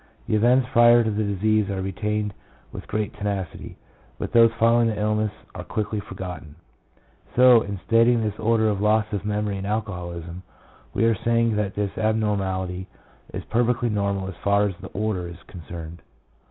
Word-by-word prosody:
The - - +1
events 125 +4 +4
prior 120 -1 +6
to 110 - 0
the 105 +1 -1
disease 105 +1 +1
are 100 -1 -2
retained 105 +1 -2 0.4
with - - -9
great 105 -1 -2
tenacity, 100 -3 -5 0.4
but - - -5
those 115 -1 +6
following 115 +1 +3
the 110 -2 -2
illness 105 0 0 0.2
are - - -7
quickly 105 0 -3
forgotten. 90 -6 -8 0.8
So, 125 -2 +7
in 100 -2 -5
stating 115 0 +4
this 105 -1 -3
order 110 0 +2
of 100 -2 0
loss 105 +1 +3
of 100 0 -3
memory 105 -1 -1
in 95 - -5
alcoholism, 90 -5 -4 0.5
we 115 - +1
are 115 - +4
saying 115 +1 +1
that 100 -2 -2
this 100 -1 -2
ab 110 0 +2
normality 95 -4 -2 0.4
is - - -5
perfectly 120 +1 +1
normal 100 -2 -1
as 95 - -5
far 100 +1 +3
as 100 - -3
the - - -7
order 100 -4 -2
is 85 0 -11
concerned. 85 -1 -9
105 Hz, 170 wpm, -24 LUFS, 95-110 Hz, 0.8 s, So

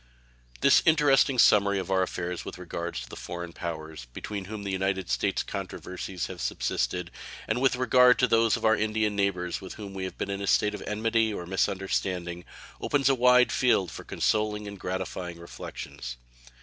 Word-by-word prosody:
This - - +6
interesting 145 -4 +4
summary 100 -3 +5
of 95 0 -3
our 95 0 +3
affairs 90 -1 -3
with - - -7
regard 85 -1 -5
to - - -5
the - - -9
foreign 85 -1 -6
powers 80 -5 -6
between 100 +5 -5
whom 105 +1 -6
and - - -8
the 100 - -2
United 95 -3 -1
States 60 - 0
controversies 90 0 -5
have 90 -3 -7
subsisted, 85 +9 -1 0.4
and 115 +3 0
with 135 -1 +3
regard 125 0 +5
also 125 - +3
to - - -1
those 115 -1 +3
of - - -4
our 110 0 +5
Indian 110 -1 0
neighbors 95 -3 -1
with 95 - -8
whom 100 -2 -8
we 95 -1 -4
have 95 - -7
been 100 - -3
in 100 0 -3
a 100 - -3
state 105 +1 +3
of 105 - -6
enmity 110 +1 +1
or 90 -4 -5
misunderstanding, 90 -2 -1 0.4
opens 140 -2 +2
a - - +5
wide 125 0 +5
field 100 - +2
for - - -8
consoling 105 -1 0
and 100 -1 -8
gratifying 90 -2 -4
reflections. 70 -6 -8
95 Hz, 190 wpm, -27 LUFS, 90-110 Hz, 0.4 s, This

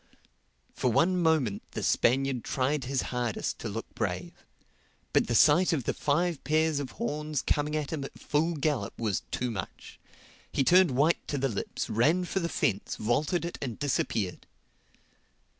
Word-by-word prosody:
For 125 - 0
one 175 +10 +3
moment 160 - +2
the - - -3
Spaniard 130 0 +2
tried 135 +1 -1
his 135 0 -1
hardest 120 -3 -2
to - - -4
look - - -4
brave. - - -3 0.8
But - - +3
the 120 - 0
sight 170 +8 +5
of 140 -6 0
the - - -1
five 165 +2 0
pairs 155 -1 +2
of 140 -3 -5
horns 150 - -2
coming 150 +1 0
at 150 -2 -2
him 150 -3 -3
at 135 - -8
full 165 +3 0
gallop 150 -2 -1
was 110 -5 -1
too 125 -1 -2
much. 95 -5 -7 0.5
He 135 - +1
turned 180 +4 +6
white 145 +6 +1
to 145 - -2
the 135 0 0
lips, 100 - -3
ran 155 +12 +2
for 190 - -1
the 170 -2 -2
fence, 100 - -1
vaulted 145 +10 0
it 170 - -6
and 125 -5 -4
disappeared. 110 -9 -1
145 Hz, 165 wpm, -29 LUFS, 125-160 Hz, 0.8 s, turned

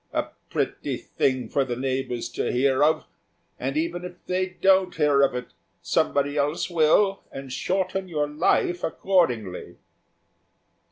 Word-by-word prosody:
A - - -1 0.2
pretty - - -2
thing 130 -3 -1
for 140 - +1
the 125 -2 -3
neighbours 130 -1 -2
to - - -2
hear 135 +2 +2
of! 155 +1 +2 0.5
and 135 +3 -2
even 170 +2 -1
if 180 0 -6
they 185 +1 0
don't 190 -1 +4
hear 145 -3 +3
of 135 -2 +3
it, 125 -1 -6 0.3
somebody 145 +1 +1
else 150 +5 0
will, 175 +5 +3
and 135 -1 -7
shorten 190 +5 -1
your 150 -3 0
life 165 +4 +1
accordingly." 125 - 0
150 Hz, 135 wpm, -25 LUFS, 130-180 Hz, 0.5 s, don't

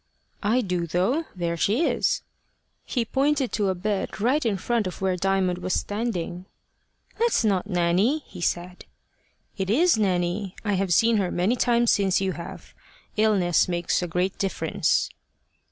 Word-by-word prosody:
"I 230 +5 +2
do, 180 -5 -2
though. 195 - 0
There 170 -2 -2
she 215 - +1
is." - - +1 0.6
He 240 -3 -1
pointed 275 +1 +1
to 205 -3 0
a 190 - 0
bed 200 +3 -3
right 260 +8 +2
in 215 -4 0
front 230 +2 0
of 180 - -7
where 190 -1 0
Diamond 185 -1 0
was 185 0 -1
standing. 190 -5 -3 0.7
"That's 465 - +2
not 200 -2 +1
Nanny," 185 - +2
he 180 - -11
said. 175 +2 -2 0.7
"It 190 -1 -2
is 310 - +4
Nanny. 185 0 0
I 205 - +1
have 190 -1 0
seen 225 +6 +4
her 190 -3 0
many 185 +9 +1
times 240 -1 +3
since 195 -2 +2
you 190 -1 0
have. 170 -1 -9 0.4
Illness 205 -5 +3
makes 175 -1 0
a 180 - -2
great 180 +3 -1
difference." 195 -1 0
195 Hz, 155 wpm, -25 LUFS, 180-230 Hz, 0.7 s, is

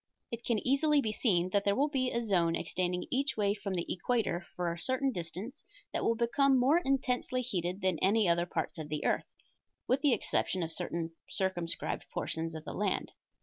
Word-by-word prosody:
It 235 0 -5
can 235 - +1
easily 290 +3 +4
be 220 -6 0
seen 185 -5 +1
that 200 0 +2
there 200 0 +2
will 280 +3 +3
be 265 -4 0
a 235 - -1
zone 175 -6 +2
extending 180 0 -1
each 270 -2 0
way 200 -1 +2
from 200 -2 -4
the 170 - -1
equator 190 -2 0
for 175 -2 -1
a 170 - -8
certain 260 +8 +1
distance 185 - -5 0.3
that - - -1
will 230 - +2
become 265 +4 +3
more 280 +7 +5
intensely 255 -3 0
heated 185 -4 -2
than 185 -4 +1
any 205 +1 +3
other 170 0 +2
parts 165 -2 -2
of 155 -1 -6
the 150 0 -3
earth, - - +1 0.6
with 265 +2 +2
the 285 -3 +4
exception 185 -5 0
of 165 - -3
certain 165 -1 -2 0.2
circumscribed 190 -4 -1
portions 165 0 -3
of 155 0 -7
the - - -5
land. 200 -2 -1
200 Hz, 195 wpm, -32 LUFS, 175-255 Hz, 0.6 s, more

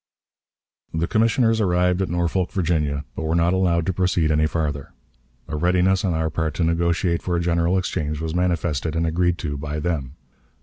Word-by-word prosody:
The 80 +1 +1
commissioners 115 +2 +2
arrived 90 -1 +2
at 95 - -1
Norfolk, 85 +1 0
Virginia, 75 -6 0
but - - -4
were 80 +1 -1
not 85 +1 +3
allowed 85 -3 +2
to 95 - 0
proceed 90 -3 +1
any 75 0 +3
farther. 75 -4 -3 0.5
A 80 - -4
readiness 90 +4 +2
on 90 -4 0
our 80 0 -1
part 80 -1 -2
to 90 - 0
negotiate 85 +1 +1
for 90 - -2
a - - +1
general 85 +1 +1
exchange 75 -5 -2
was 80 0 -3
manifested, 85 -3 -1
and 85 0 +1
agreed 85 +2 +1
to 75 -5 -4
by 75 +1 -4
them. 75 -5 -3
85 Hz, 180 wpm, -22 LUFS, 80-90 Hz, 0.5 s, not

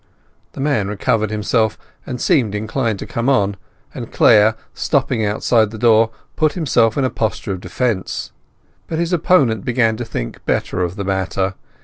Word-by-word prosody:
The - - -10
man 135 -9 +1
recovered 110 +1 0
himself, 110 +1 0 0.3
and 125 - -4
seemed 120 - +2
inclined 110 +1 -1
to - - -6
come 115 +3 -1
on, 100 -7 +2 0.4
and 120 -3 -7
Clare, 110 -1 +5 0.2
stepping 130 -5 0
outside 110 +1 +2
the 110 - -8
door, 115 0 +4 0.3
put 155 -1 +2
himself 120 - +2
in 135 - +2
a 130 - -1
posture 105 -3 -2
of 95 -2 -4
defence. 115 -6 -2 0.6
But 160 - -3
his 170 +2 -1
opponent 140 - +3
began 115 -3 +1
to 120 - -4
think - - -6
better - - 0
of 90 0 -2
the 100 -2 -4
matter. 95 0 -1
110 Hz, 165 wpm, -19 LUFS, 105-125 Hz, 0.6 s, Clare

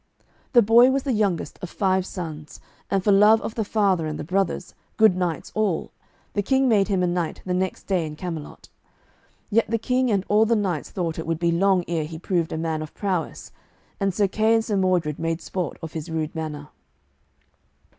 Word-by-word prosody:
The 240 -2 +7
boy 235 +4 +6
was 270 0 0
the 265 - 0
youngest 200 -8 -1
of 185 - -5
five 190 -1 0
sons, 155 -4 -7 0.3
and 195 -2 0
for 205 - +3
love 210 +3 +6
of - - -4
the 225 - -1
father 195 -6 +1
and 155 -1 -4
the - - -5
brothers, 185 +2 -1 0.2
good 220 -4 +5
knights 175 -4 -2
all, 210 -6 -1 0.4
the 205 - +1
King 265 +6 +2
made 205 -5 +3
him 190 -3 +1
a - - +3
knight 175 -2 -2
the 180 - -1
next 185 +1 -2
day 185 -4 0
in 150 - -7
Camelot; 165 -2 -7 0.8
yet 225 +1 +2
the 230 - +1
King 250 +3 0
and 200 -3 +1
all 215 +2 +4
the 230 - +3
knights 185 -8 -1
thought 165 -3 -3
it 160 - -5
would 165 -1 0
be 170 0 +1
long 185 +1 +2
ere 165 -3 -1
he 160 +1 -7
proved 170 -1 -1
a - - -3
man 160 -1 -2
of 155 - -8
prowess, 185 -5 -3 0.5
and 195 -1 +1
Sir 200 +2 +1
Kay 220 +3 +2
and 225 0 +1
Sir 210 - -1
Mordred 180 -6 +1
made 165 0 -1
sport 180 -5 -4
of 160 - -6
his 160 +1 -5
rude 160 -1 -3
manner. 150 -2 -5
185 Hz, 205 wpm, -24 LUFS, 165-210 Hz, 0.8 s, The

